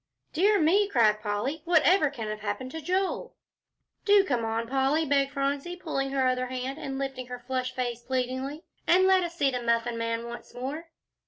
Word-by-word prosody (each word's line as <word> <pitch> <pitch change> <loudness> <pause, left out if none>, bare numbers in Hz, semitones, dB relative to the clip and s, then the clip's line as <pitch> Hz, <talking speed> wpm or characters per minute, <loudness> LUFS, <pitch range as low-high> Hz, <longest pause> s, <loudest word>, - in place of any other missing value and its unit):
"Dear 400 +5 +4
me!" 380 +6 +4
cried 215 - +3
Polly, 215 +9 -2
"whatever 340 -1 +4
can 235 -6 -6
have 215 0 -4
happened 215 +5 -4
to 320 - -6
Joel?" 370 +4 -1 0.7
"Do 405 -1 +6
come 250 -10 -1
on, 225 +1 -2
Polly," 270 +5 +1
begged 275 -1 +2
Phronsie, 280 +4 -2
pulling 310 -7 -2
at 270 - -6
her 265 -1 +2
other 255 0 0
hand, 255 +2 -4
and 270 -1 -4
lifting 270 -2 -4
her 250 0 -6
flushed 255 0 -2
face 245 -2 -2
pleadingly, 260 +4 -3 0.2
"and 370 +2 +5
let 380 -1 +5
us 340 0 -5
see 280 -5 +2
the 250 -1 -3
Muffin 235 0 0
Man 230 0 -2
once 235 0 -9
more." 285 +7 -5
270 Hz, 190 wpm, -27 LUFS, 245-315 Hz, 0.7 s, Do